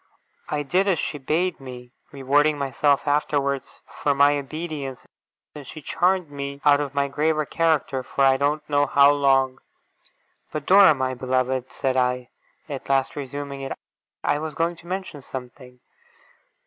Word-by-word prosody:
I 150 -1 -1
did 185 +8 +1
as 190 -4 +2
she 150 - -3
bade 165 +7 -1
me 125 -2 -10 0.2
rewarding 145 +2 +2
myself 140 +1 +1
afterwards 140 -2 -1
for 145 -1 -1
my 145 +1 +5
obedience 145 -3 -6 0.5
and 145 -3 -10
she 155 - -9
charmed 180 0 +1
me 140 0 -6
out 145 0 +5
of 140 -1 -5
my 140 0 +1
graver 155 +2 0
character 155 -5 0
for 135 +2 0
I 135 0 +5
don't 150 +2 -1
know 145 -1 +2
how 140 +1 +6
long. 135 -2 +2 0.9
'But, 150 -2 -5
Dora, 190 -5 +7
my 130 -1 -1
beloved!' 130 0 -1
said 130 -2 -1
I, 125 -1 0 0.4
at 140 -3 -7
last 135 -1 +1
resuming 140 0 -6
it; 135 0 -4 0.5
'I 145 - +1
was 155 -1 -5
going 170 +1 0
to 170 - -16
mention 185 -5 -5
something. 125 -1 -10
140 Hz, 155 wpm, -23 LUFS, 135-150 Hz, 0.9 s, Dora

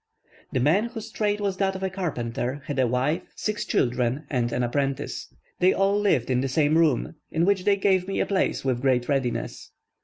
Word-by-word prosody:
The - - 0
man, 160 - +3
whose 230 -2 -7
trade 210 -1 0
was 200 -2 -1
that 195 -1 0
of 190 - -5
a 190 - 0
carpenter, 130 -7 -3
had 145 -2 -3
a 130 - +3
wife, 130 +6 0
six 215 -1 -2
children, 125 +3 0
and 120 -3 0
an 125 - 0
apprentice. 135 +2 -2 0.3
They 185 +1 +5
all 195 +1 +2
lived 135 - +1
in 125 0 +2
the 135 - 0
same 150 +3 +2
room, 160 -5 +2 0.2
in 165 +1 +1
which 195 -1 +1
they 205 -1 +5
gave 190 -2 +2
me 195 - -2
a - - +2
place 190 -7 0
with 125 -2 0
great 125 -2 +2
readiness. 135 -4 -2
150 Hz, 205 wpm, -25 LUFS, 125-195 Hz, 0.3 s, They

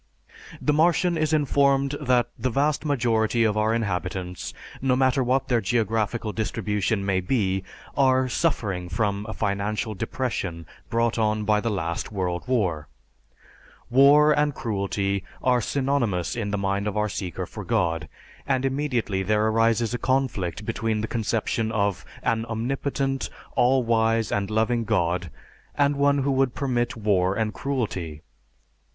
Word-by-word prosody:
The 150 - +1
Martian 170 +3 +3
is 155 -1 0
informed 140 -2 +2
that 125 -3 +2
the 130 +3 -1
vast 145 +4 0
majority 115 -5 +2
of 110 -2 +2
our 110 +1 +2
inhabitants, 95 -4 -3 0.3
no 130 -1 +2
matter 130 0 +2
what 130 +2 +1
their 120 -3 +2
geographical 110 +1 0
distribution 105 -2 -1
may 95 -1 +1
be, 95 -2 0 0.3
are 130 -1 +3
suffering 105 - -1
from 100 +2 -1
a - - -4
"financial 105 +1 -1
depression" 95 -6 -3 0.2
brought 115 0 +1
on 110 -1 +1
by 105 0 +2
the 115 - -1
last 85 -4 -3
World 90 -3 -2
War. 90 - 0 1.0
War 145 +4 +6
and 150 -1 +2
cruelty 100 -3 -1 0.2
are 125 -1 +3
synonymous 125 -9 0
in 115 -4 -2
the 105 - -1
mind 100 +1 -1
of 105 0 -2
our 105 0 +2
seeker 90 -3 -4
for - - -8
God; 85 -9 0 0.4
and 135 -1 +1
immediately, 130 -8 -1
there 105 +2 +1
arises 115 +1 +2
a 120 - -2
conflict 115 -8 -1
between 110 -1 -1
the 110 - -2
conception 115 0 -1
of 100 -4 0 0.2
an 115 -2 +1
omnipotent, 135 +4 -2 0.3
all 125 +1 +4
wise 115 -1 +1
and 100 0 -1
loving 110 +2 +1
God 90 -5 0 0.5
and 145 0 +2
one 140 0 +2
who 140 - +1
would 135 -2 +1
permit 120 -3 -1
war 100 -3 +2
and 110 -1 -1
cruelty. 95 - -3
115 Hz, 145 wpm, -25 LUFS, 100-130 Hz, 1.0 s, War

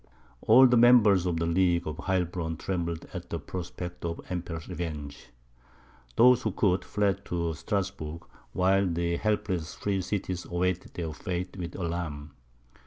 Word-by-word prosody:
All 125 +4 +7
the 125 -1 +5
members 110 -6 +6
of 85 -2 0
the 85 - 0
League 85 0 +2
of 75 -1 -4
Heilbronn 90 -3 -1
trembled 85 -2 -3
at - - -7
the - - -2
prospect 90 -1 -7
of 85 -1 -2
the - - -13
Emperor's 85 -2 -4
revenge; 75 -5 -6 0.9
those 125 0 +6
who - - -2
could, 95 -5 +2
fled 100 -1 0
to 85 -2 -2
Strasburg, 90 -2 -3 0.3
while 95 +1 +3
the 85 0 -1
helpless 95 -6 -1
free 100 -2 -1
cities 95 -2 -3
awaited 90 +1 -2
their 80 -3 -3
fate 90 +3 -4
with 90 -3 -6
alarm. 80 -4 -4
90 Hz, 150 wpm, -28 LUFS, 85-95 Hz, 0.9 s, All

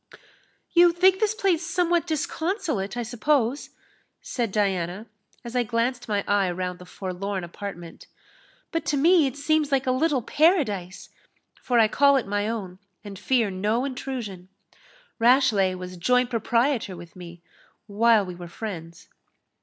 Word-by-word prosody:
"You 345 0 +6
think 375 +2 +4
this 435 -1 +1
place 370 -6 +1
somewhat 350 -1 0
disconsolate, 310 - -2
I 240 - -1
suppose?" 245 +3 0 0.5
said 235 -5 -3
Diana, 190 -1 -1 0.4
as 240 0 -8
I 250 - +3
glanced 240 +2 -1
my 205 -2 0
eye 200 -2 +2
round 180 0 -4
the 180 - -13
forlorn 190 +1 -4
apartment; 175 -1 -9 0.6
"but 330 -1 -1
to 290 - +1
me 325 +1 +5
it 265 - -6
seems 305 0 +1
like 270 -1 +1
a 255 - +2
little 265 -1 +1
paradise, 215 - +1 0.5
for 245 - 0
I 225 -2 +6
call 280 +5 +4
it 260 - -1
my 205 +1 -1
own, 190 -5 -5 0.2
and 200 -3 -9
fear 230 -1 +1
no 210 +7 0
intrusion. 240 -9 -6 0.7
Rashleigh 230 -6 +4
was 180 0 -8
joint 250 +7 +2
proprietor 230 -3 0
with 170 -1 -12
me, 175 -1 -11 0.4
while 220 0 +3
we 180 - -7
were 175 0 -9
friends." 170 -3 -8
230 Hz, 145 wpm, -25 LUFS, 190-280 Hz, 0.7 s, You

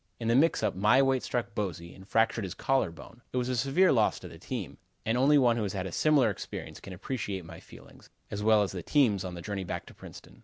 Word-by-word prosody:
In 115 -1 -2
the - - +4
mixup 125 - +3
my 105 +7 +4
weight 135 -1 +2
struck 120 -5 -3
Bosey 85 -5 -4
and 95 0 -15
fractured 115 +1 +1
his 95 - -5
collar 135 -8 +1
bone. 100 +8 -14
It - - -3
was 125 0 0
a 130 - 0
severe 140 +10 +3
loss 110 -5 +2
to - - -8
the - - -12
team, - - -6 0.3
and 115 - +1
only 140 +4 +5
one 120 -4 +4
who - - -1
has 100 -3 -2
had 95 -2 -3
a 95 - -5
similar 140 - +3
experience - - -7
can 95 - -10
appreciate 95 -2 -4
my - - -10
feelings, - - -16 0.2
as 105 - -4
well 105 -1 +4
as 100 - -3
the 90 - -5
team's, 110 - +2
on 90 -1 -6
the 85 - -8
journey 100 -2 -4
back 90 - -5
to - - -14
Princeton. - - -13
110 Hz, 255 wpm, -29 LUFS, 95-130 Hz, 0.3 s, only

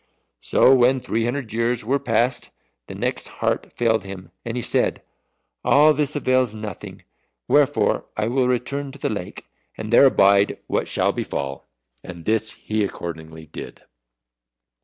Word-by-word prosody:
So 130 - +4
when 130 +1 +4
three 115 -2 -1
hundred 120 -2 -3
years 115 0 0
were 135 +4 +1
past, 120 +1 0 0.4
the - - -8
Neck's - - -2
heart - - -2
failed 115 -3 +1
him, 95 -2 -9
and 115 +1 -4
he 120 - -2
said, - - 0 0.6
"All 150 +2 +5
this 150 -1 -1
avails 130 -5 +1
nothing. 105 -3 -8 0.4
Wherefore 145 0 +2
I 105 0 0
will 125 +1 +1
return 135 +3 -2
to - - -10
the - - -1
lake, 100 -4 -6 0.3
and 110 +1 -5
there 135 - +8
abide 100 -4 +4
what - - -1
shall - - +1
befall." 70 -1 -5 0.3
And 85 -2 -10
this 110 0 0
he 110 0 -2
accordingly 80 -4 -6
did. 75 - -10
115 Hz, 150 wpm, -22 LUFS, 100-130 Hz, 0.6 s, there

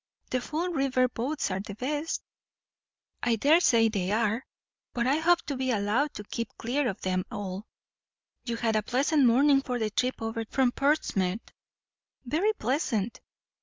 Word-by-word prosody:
"The 255 - 0
Fall 320 +7 -2
River 270 -5 +2
boats 250 +1 -2
are 185 - -1
the 200 0 -7
best." 295 +7 -2 1.0
"I 240 -1 +2
daresay 255 -3 +4
they 195 -4 -1
are, 225 +2 +1 0.5
but 235 -1 0
I 270 +4 +3
hope 345 +2 +3
to 285 - -4
be 260 0 -2
allowed 230 +6 +1
to 210 - -6
keep 230 +2 -4
clear 260 +4 0
of 195 - -4
them 185 0 0
all. 195 0 -5 0.8
You 235 -2 -3
had 230 -1 0
a 215 - +3
pleasant 270 +5 +2
morning 275 +4 +5
for 250 -2 -3
the 220 -2 -1
trip 255 +4 0
over 225 0 -3
from 260 -2 +2
Portsmouth." 230 -9 0 0.7
"Very 330 - +2
pleasant." 235 - -1
245 Hz, 160 wpm, -28 LUFS, 215-285 Hz, 1.0 s, morning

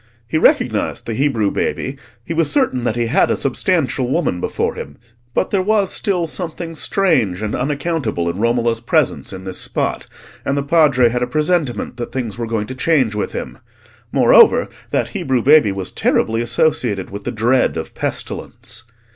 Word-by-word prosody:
He 155 - 0
recognised - - +1
the 115 - -3
Hebrew 115 -5 +1
baby, 130 - -2 0.3
he 165 - -3
was 165 -2 +1
certain 130 - +1
that 110 - 0
he 120 -1 0
had 115 - +2
a - - +1
substantial 135 -2 0
woman 135 - 0
before - - -1
him; 70 +1 -8 0.4
but - - 0
there 195 - +2
was 205 0 +1
still 180 -4 0
something 165 0 -4
strange 130 - +1
and 105 - -2
unaccountable 140 - -1
in 85 +3 -3
Romola's 115 0 +1
presence 120 - 0
in 95 0 -8
this 95 -1 -4
spot, - - -2 0.4
and 140 - -1
the 140 - 0
Padre 140 -5 +4
had 125 +1 -2
a 125 - 0
presentiment 150 -3 -1
that 120 - -5
things 120 -6 -3
were 120 0 -4
going 110 -2 -1
to 130 - -7
change 130 -4 +1
with 105 - -3
him. - - -6 0.5
Moreover, - - +5 0.2
that - - 0
Hebrew 130 -3 -1
baby 145 -7 +6
was 95 -1 -4
terribly 115 +1 +1
associated 120 -6 0
with 100 +1 -7
the - - -3
dread 120 -3 +1
of 80 - -5
pestilence. 120 -1 -4
125 Hz, 175 wpm, -18 LUFS, 110-155 Hz, 0.5 s, baby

